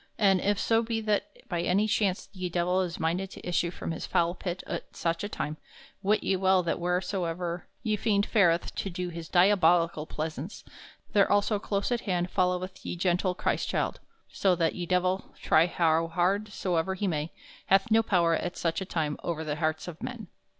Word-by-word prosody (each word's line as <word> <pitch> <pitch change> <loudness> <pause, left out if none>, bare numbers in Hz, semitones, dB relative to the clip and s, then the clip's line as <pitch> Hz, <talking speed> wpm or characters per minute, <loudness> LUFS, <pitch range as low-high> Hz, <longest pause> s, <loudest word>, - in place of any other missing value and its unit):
And 195 -4 +4
if 205 0 +1
so 225 0 +3
be 225 -1 -2
that 215 -2 -2
by 175 -2 -1
any 195 +5 +2
chance 200 -3 0
ye 185 -2 -4
Divell 180 +2 +1
is 175 -2 -3
minded 175 +4 -1
to - - -10
issue 175 -1 +1
from 170 - -5
his 165 - -5
foul 170 0 +2
pit 180 0 -5
at 170 - -6
soche 165 +1 -1
a 205 - -3
time, 155 -6 -4 0.4
wit 205 +2 +2
ye 195 - +2
well 190 0 +3
that 170 - -1
wheresoever 175 -1 -2 0.2
ye 215 -3 +1
fiend 205 -1 +2
fareth 175 -6 +2
to 195 - -2
do 180 0 -4
his 165 -1 -7
diabolical 175 -4 +4
plaisaunce 155 +3 -5 0.5
there 200 -3 +4
also 205 +1 +2
close 200 +2 -2
at 240 -1 +1
hand 180 -3 -1
followeth 185 0 -1
ye - - -4
gentle 180 +1 +1
Chrystchilde; - - -1 0.3
so 190 -2 +2
that 165 -2 +1
ye 175 -2 -5
Divell, 185 +1 0
try 160 +2 +4
how 165 -1 +2
hard 180 +5 +1
soever 190 -2 -1
he 200 - -2
may, 155 -2 -1 0.4
hath 195 +4 +3
no 225 +1 +6
power 175 -6 +2
at 175 +2 -2
soche 165 +2 -1
a - - -3
time 155 -5 -2
over 165 -2 -3
the 150 -1 -3
hartes 160 0 -1
of 170 -2 -8
men. 230 -7 -6
180 Hz, 190 wpm, -28 LUFS, 170-195 Hz, 0.5 s, no